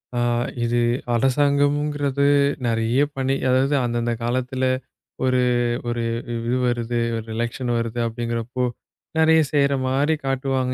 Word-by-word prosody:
ஆ -, -, 0 dB, 0.4 s
இது 120 Hz, +1 st, +1 dB, 0.4 s
அரசாங்கம்ங்கிறது 145 Hz, +2 st, +1 dB, 0.4 s
நெறைய 115 Hz, +2 st, +1 dB, 0.2 s
பண்ணி, 135 Hz, 0 st, 0 dB
அதாவது 135 Hz, +3 st, +3 dB
அந்தந்த 120 Hz, 0 st, -1 dB
காலத்துல 130 Hz, +2 st, -1 dB, 0.6 s
ஒரு 130 Hz, -1 st, +2 dB, 0.5 s
ஒரு 120 Hz, 0 st, -2 dB, 0.3 s
இது 115 Hz, +2 st, -1 dB
வருது 120 Hz, 0 st, -1 dB, 0.2 s
ஒரு 110 Hz, -, -6 dB
எலக்சன் 120 Hz, +1 st, -2 dB
வருது 115 Hz, +1 st, -3 dB
அப்படிங்கிறப்போ, 115 Hz, +2 st, -3 dB, 0.5 s
நெறைய 160 Hz, 0 st, +5 dB
செய்ற 140 Hz, -1 st, +3 dB
மாரி 145 Hz, +4 st, +2 dB
காட்டுவாங்க. 135 Hz, -1 st, 0 dB
130 Hz, 110 wpm, -22 LUFS, 120-140 Hz, 0.6 s, நெறைய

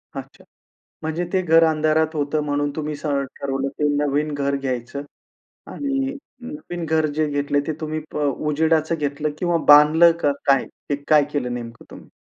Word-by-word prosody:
अच्छा. -, -, -9 dB, 0.6 s
म्हणजे 160 Hz, +3 st, -2 dB
ते 185 Hz, -, +2 dB
घर 165 Hz, -1 st, +5 dB
अंधारात 155 Hz, 0 st, +1 dB
होतं 150 Hz, +1 st, -1 dB
म्हणून 145 Hz, 0 st, -1 dB
तुम्ही 150 Hz, -1 st, -3 dB
स 145 Hz, -, -10 dB
ठरवलं, 140 Hz, -1 st, -2 dB
ते 150 Hz, +2 st, -1 dB
नवीन 150 Hz, +1 st, 0 dB
घर 140 Hz, -1 st, -1 dB
घ्यायचं 130 Hz, 0 st, -4 dB, 0.7 s
आणि 275 Hz, -1 st, -2 dB, 0.3 s
नवीन 245 Hz, -, -7 dB
घर 160 Hz, 0 st, +2 dB
जे 155 Hz, 0 st, +1 dB
घेतलंय 145 Hz, 0 st, 0 dB
ते 160 Hz, -, -1 dB
तुम्ही 155 Hz, 0 st, -3 dB
ब -, -, -2 dB
अ, 150 Hz, -, 0 dB, 0.2 s
उजेडाचं 160 Hz, +1 st, +1 dB
घेतलं 150 Hz, 0 st, -2 dB
किंवा 175 Hz, -2 st, +1 dB
बांधलं 155 Hz, +3 st, +7 dB
का? 145 Hz, -, +2 dB
काय? 135 Hz, -1 st, +3 dB, 0.4 s
काय 150 Hz, -2 st, +5 dB
केलं 125 Hz, -4 st, -2 dB
नेमकं 115 Hz, -1 st, -8 dB
तुम्ही? -, -, -13 dB
150 Hz, 160 wpm, -22 LUFS, 145-160 Hz, 0.7 s, बांधलं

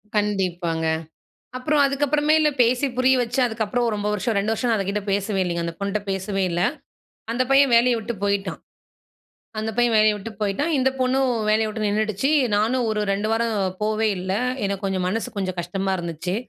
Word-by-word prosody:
கண்டிப்பாங்க. 180 Hz, -6 st, -1 dB, 0.7 s
அப்புறம் 290 Hz, +3 st, +1 dB
அதுக்கப்புறமேல 295 Hz, +2 st, +2 dB
பேசி 245 Hz, +4 st, +2 dB
புரிய 260 Hz, +1 st, +4 dB
வச்சு 245 Hz, +2 st, -2 dB
அதுக்கப்புறம் 230 Hz, +1 st, -1 dB
ரொம்ப 205 Hz, 0 st, -2 dB
வருஷம் 210 Hz, +2 st, -1 dB
2 205 Hz, +2 st, 0 dB
வருஷம் 245 Hz, +2 st, -1 dB
நான் 225 Hz, -, +2 dB
அது 195 Hz, -, -2 dB
கிட்ட 205 Hz, +1 st, -1 dB
பேசவே 200 Hz, 0 st, 0 dB
இல்லைங்க. 170 Hz, -1 st, -2 dB
அந்த 170 Hz, -, -4 dB
பொண்ணுட்ட 200 Hz, +1 st, -2 dB
பேசவே 195 Hz, +1 st, -2 dB
இல்ல. 175 Hz, +1 st, -1 dB, 0.7 s
அந்த 245 Hz, +2 st, +1 dB
பையன் 275 Hz, -1 st, +5 dB
வேலைய 240 Hz, +1 st, +4 dB
விட்டு 225 Hz, +2 st, -4 dB
போயிட்டான். 200 Hz, 0 st, -1 dB, 1.0 s
அந்த 220 Hz, +1 st, -2 dB
பையன் 240 Hz, -1 st, +3 dB
வேலைய 215 Hz, 0 st, +4 dB
விட்டு 210 Hz, +2 st, -8 dB
போயிட்டான். 215 Hz, +11 st, 0 dB
இந்த 260 Hz, 0 st, +3 dB
பொண்ணும் 260 Hz, +1 st, +2 dB, 0.2 s
வேலைய 220 Hz, +1 st, +2 dB
விட்டு 215 Hz, 0 st, -4 dB
நின்னுடுச்சு. 215 Hz, +5 st, 0 dB, 0.3 s
நானும் 235 Hz, +3 st, +1 dB
ஒரு 215 Hz, -1 st, -1 dB
2 205 Hz, +2 st, -1 dB
வாரம் 230 Hz, 0 st, 0 dB, 0.3 s
போவே 215 Hz, +1 st, +1 dB
இல்ல, 185 Hz, +1 st, -3 dB, 0.3 s
எனக்கு 200 Hz, 0 st, -3 dB
கொஞ்சம் 190 Hz, -1 st, -1 dB
மனசு 220 Hz, +4 st, -2 dB
கொஞ்சம் 185 Hz, -2 st, -2 dB
கஷ்டமா 190 Hz, +3 st, -2 dB
இருந்துச்சு. 170 Hz, +2 st, -4 dB
215 Hz, 170 wpm, -23 LUFS, 195-245 Hz, 1.0 s, பையன்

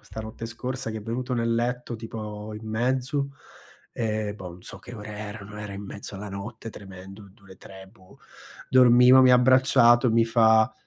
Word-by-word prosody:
stanotte 110 Hz, +1 st, -8 dB
scorsa, 125 Hz, +2 st, -5 dB
che 110 Hz, -, -5 dB
è -, -, -10 dB
venuto 125 Hz, +3 st, -3 dB
nel 115 Hz, -1 st, 0 dB
letto, 120 Hz, 0 st, -2 dB
tipo, 110 Hz, -1 st, -7 dB
in 110 Hz, -, -11 dB
mezzo, 130 Hz, +5 st, -1 dB, 0.6 s
ehm, 110 Hz, -2 st, -2 dB
boh, 90 Hz, -4 st, -9 dB
n' 90 Hz, -, -18 dB
so -, -, -8 dB
che -, -, -11 dB
ore 105 Hz, -1 st, -9 dB
erano, 105 Hz, 0 st, -8 dB
era 100 Hz, -1 st, -7 dB
in 100 Hz, -, -7 dB
mezzo 100 Hz, +1 st, -8 dB
alla 100 Hz, +1 st, -7 dB
notte 110 Hz, +3 st, -7 dB
tremendo, 95 Hz, +1 st, -12 dB
du 100 Hz, +1 st, -25 dB
le 95 Hz, -1 st, -15 dB
3, 95 Hz, 0 st, -13 dB
boh. 95 Hz, -4 st, -20 dB, 0.5 s
Dormivo, 125 Hz, 0 st, +7 dB
mi 130 Hz, -, +6 dB
ha -, -, +7 dB
abbracciato, 125 Hz, -1 st, +5 dB
mi 115 Hz, 0 st, +3 dB
fa: 110 Hz, -1 st, +4 dB
110 Hz, 180 wpm, -25 LUFS, 105-125 Hz, 0.6 s, Dormivo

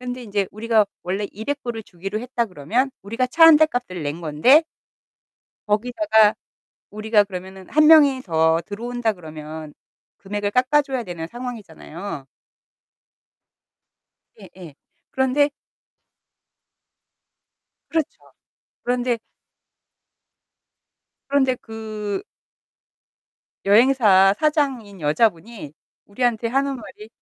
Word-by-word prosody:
근데 250 Hz, 0 st, -6 dB
인제 200 Hz, -3 st, -2 dB
우리가 220 Hz, 0 st, +2 dB, 0.2 s
원래 195 Hz, +3 st, -3 dB
$200 240 Hz, +3 st, -4 dB
을 220 Hz, -, -6 dB
주기로 195 Hz, +3 st, -6 dB
했다 245 Hz, -1 st, -2 dB
그러면 215 Hz, -, -1 dB
우리가 230 Hz, +5 st, -2 dB
차 325 Hz, +6 st, +5 dB
1 320 Hz, -2 st, +9 dB
대 315 Hz, -, +6 dB
값을 245 Hz, -, -5 dB
낸 150 Hz, +3 st, -4 dB
건데 170 Hz, -, +4 dB, 1.0 s
거기다가 220 Hz, 0 st, +3 dB, 0.6 s
우리가 215 Hz, 0 st, +2 dB
그러면은 190 Hz, 0 st, -9 dB
1 305 Hz, +1 st, +4 dB
명이 290 Hz, -5 st, +6 dB
더 160 Hz, -3 st, +2 dB
들어온다 235 Hz, +2 st, -2 dB
그러면 155 Hz, -3 st, -9 dB, 0.5 s
금액을 205 Hz, +1 st, -3 dB
깎아줘야 260 Hz, +1 st, +1 dB
되는 170 Hz, -4 st, -6 dB
상황이잖아요. 200 Hz, -, -8 dB, 2.1 s
예예. 170 Hz, -6 st, -13 dB, 0.4 s
그런데 265 Hz, +2 st, +1 dB, 2.4 s
그렇죠. 320 Hz, -3 st, -2 dB, 0.6 s
그런데 245 Hz, -1 st, 0 dB, 2.1 s
그런데 265 Hz, -2 st, +2 dB
그 215 Hz, -, -6 dB, 1.4 s
여행사 205 Hz, -3 st, +5 dB
사장인 270 Hz, -, -1 dB
여자분이 165 Hz, +2 st, -1 dB, 0.3 s
우리한테 230 Hz, +1 st, -1 dB
하는 275 Hz, +2 st, 0 dB
말이 215 Hz, -2 st, -12 dB
220 Hz, 215 characters per minute, -22 LUFS, 190-255 Hz, 2.4 s, 1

